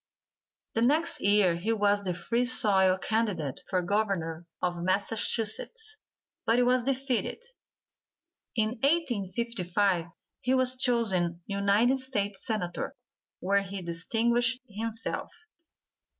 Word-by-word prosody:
The 225 - 0
next 305 +7 +2
year 200 -4 +3
he 205 +6 -1
was 205 -2 +2
the 185 -3 -3
Free 230 +8 -1
Soil 190 -6 +4
candidate 190 - -2
for 185 -2 0
Governor 175 -4 -1
of 175 -1 -2
Massachusetts, 225 - +1 0.5
but 230 - +2
was 250 0 +3
defeated. 265 - -1 1.1
In 215 -2 +2
1855 205 - 0 0.3
he 255 +1 +1
was 255 0 +3
chosen 190 -9 +1
United 205 +6 +2
States 205 -7 -2
Senator, 195 -6 -3 0.5
where 200 +2 +2
he 195 -1 -6
distinguished 235 +9 +1
himself. 225 +2 -4
210 Hz, 105 wpm, -28 LUFS, 185-240 Hz, 1.1 s, Soil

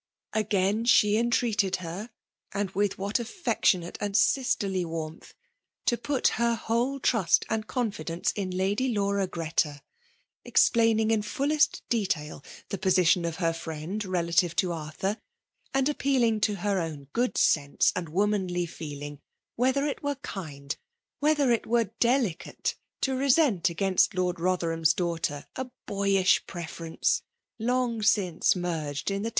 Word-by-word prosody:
Again 210 0 +1
she 210 -3 +5
entreated 225 -4 +1
her, 185 +5 -6 0.2
— - - -26
and 200 -1 -1
with 200 0 0
whaC 200 +4 -1
affectionate 225 - 0
and 205 -1 0
sisterly 200 -8 +1
warmth, 165 -1 -6 0.3
— - - -58
^to 240 -1 +1
put 280 -1 +1
her 235 0 +2
whole 235 +5 -1
trust 220 -9 +2
and 220 -1 -1
confidence 210 -9 -2
in 195 -3 -3
Lady 195 +8 0
Laura 200 -1 +1
Greta; 160 -4 -2 0.6
explaining 225 -1 +3
in 220 -1 +2
fullest 290 +7 +1
detail 165 - -1 0.3
the 195 - -3
position 180 -2 +3
of 165 -1 -2
her 165 -1 +1
firiend 165 +5 -5
relative 170 -1 +1
to 180 - +1
Arthur, 165 +6 -3 0.5
and 270 -1 +1
appesdiag* 260 -6 +1
to 210 0 +2
her 200 +1 0
own 160 -4 -4
good 245 +2 0
sense 145 -2 +3
and 170 -3 -3
womanly 185 -1 0
feeling;^ 145 -3 -7 0.4
wheUior 260 +4 +2
it 285 - -4
were 285 0 -1
kind, 145 - -6 0.4
whether 290 -3 +3
it 235 - 0
were 230 -3 +1
deUcai^ 235 -8 0 0.3
to 265 -1 +1
resent 260 - +3
against 190 +3 +2
Lord 180 -1 0
Botherham*e 165 -2 +1
dan^ktetf 165 -5 -2
a 260 -1 -4 0.2
boyish 195 -1 +2
prrference, 165 -2 -2 0.4
long 240 0 0
since 195 -6 +2
merged 160 -3 -3
in 195 0 -2
the. 225 - -2
195 Hz, 140 wpm, -27 LUFS, 170-230 Hz, 0.6 s, she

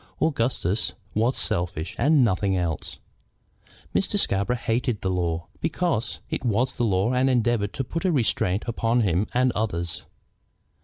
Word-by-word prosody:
Augustus 115 - 0 0.2
was 115 +5 +1
selfish 85 -2 -1
and 145 -3 +4
nothing 95 -2 +1
else. 85 -4 -3 1.0
Mr. - - +1
Scarborough 100 +5 +1
hated 120 -1 -1
the 95 - 0
law, 85 -2 -1
because 165 -6 -1
it - - -3
was 120 +2 +1
the 120 - -1
law 100 +2 +2
and 130 +1 +3
endeavored 120 -4 +1
to 135 - -2
put 165 +7 -4
a 185 - +2
restraint 110 - +1
upon 115 0 +1
him 95 -1 +1
and 125 +1 +3
others. 85 -7 -2
115 Hz, 145 wpm, -25 LUFS, 95-125 Hz, 1.0 s, and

